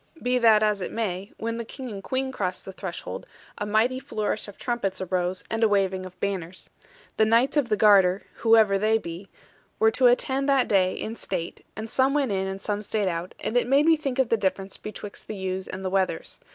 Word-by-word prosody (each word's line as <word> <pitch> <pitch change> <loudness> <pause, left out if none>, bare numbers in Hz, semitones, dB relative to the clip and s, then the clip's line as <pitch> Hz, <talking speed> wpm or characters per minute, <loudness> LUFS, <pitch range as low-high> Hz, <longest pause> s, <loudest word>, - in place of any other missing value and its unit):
Be 250 -1 +1
that 220 -2 +5
as 210 -2 +1
it - - -4
may, 200 -3 -3
when 230 +1 -3
the 235 - -3
King 255 +2 -8
and 195 -2 -7
Queen 265 +3 -1
crossed 185 -7 -3
the 190 - -6
threshold, 185 -2 -6 0.3
a 205 - -2
mighty 225 +5 +2
flourish 215 -4 -3
of 205 - -11
trumpets 215 -6 -2
arose, 180 0 -1
and 225 0 0
a - - +6
waving 190 -2 +1
of 185 - -16
banners. 185 -3 -4 0.5
The 220 - +5
Knights 235 +6 +3
of 285 -5 +2
the 210 - +2
Garter 195 -3 +5
(whoever 220 -4 +4
they 215 +2 +3
be) 175 -1 -8 0.5
were 220 0 +4
to 255 +2 +4
attend 265 +3 +2
that 270 -2 +3
day 185 -3 +2
in 225 - -5
state; 175 -3 -4
and 220 +1 -5
some 265 +4 +2
went 275 -6 +1
in, 190 -1 0
and 190 0 -4
some 205 +1 -2
stayed 210 -2 -1
out, 170 +1 -4
and 225 - -3
it 245 -1 +3
made 275 +3 +4
me 325 0 +6
think 280 -4 -3
of 265 -3 +2
the 230 - +3
difference 195 -1 -2
betwixt 210 -1 -9
the 215 - -5
ewes 190 -1 -3
and 190 0 -6
the - - 0
wethers. 190 -4 -1
210 Hz, 220 wpm, -25 LUFS, 190-235 Hz, 0.5 s, a